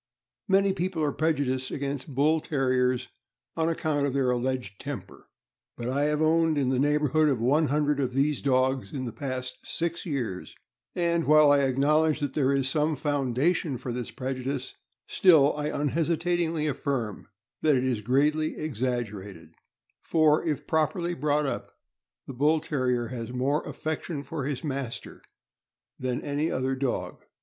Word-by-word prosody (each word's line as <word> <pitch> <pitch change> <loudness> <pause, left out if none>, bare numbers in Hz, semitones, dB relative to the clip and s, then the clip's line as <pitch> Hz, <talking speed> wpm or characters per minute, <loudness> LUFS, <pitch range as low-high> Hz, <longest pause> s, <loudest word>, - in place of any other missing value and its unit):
Many 195 0 +3
people 180 -3 -2
are 145 - +1
prejudiced 140 -5 0
against 140 0 -4
Bull 155 +4 +3
Terriers 130 -4 0 0.5
on 165 0 +1
account 150 -3 0
of 135 - -3
their 135 -2 +2
alleged 125 -5 -2
temper; - - -7 0.5
but 120 +1 -3
I 140 +3 +1
have 150 +1 +1
owned 160 0 +3
in 135 -3 +1
the 130 -1 +1
neighborhood 150 +1 +3
of 130 -5 0
one 145 +7 +3
hundred 145 +1 +1
of 130 -2 0
these 140 +2 +1
dogs 130 -1 +1
in 130 -3 -4
the 120 - -4
past 130 -2 -5
six 170 0 -3
years, 125 - -4 0.4
and 170 -1 +1
while 150 -1 +6
I 145 - +5
acknowledge 145 +4 +2
that 145 -3 -2
there 135 -2 +2
is 135 -1 +1
some 150 +2 +1
founda 145 +2 +1
tion 155 -6 -3
for 125 0 -5
this 120 -1 -4
prejudice, 130 0 -4 0.3
still 155 -6 +5
I 150 0 -2
unhesitatingly 165 +2 0
affirm 135 -7 -2 0.3
that 155 -2 +4
it 125 - +1
is 125 -5 0
greatly 150 +7 +1
exaggerated, 105 - -4 0.5
for, 155 -2 +3
if 155 -5 -2
properly 160 +2 0
brought 150 -1 +1
up, 135 - -4 0.5
the 135 - -7
Bull 150 +5 +3
Terrier 125 -6 -1
has 120 -2 -5
more 135 +5 0
affection 155 -1 -4
for 140 -1 -4
his 140 -2 -3
master 135 -5 -5 0.8
than 125 -1 -2
any 145 +3 -1
other 130 +1 -1
dog. 130 -1 -3
140 Hz, 155 wpm, -27 LUFS, 130-155 Hz, 0.8 s, while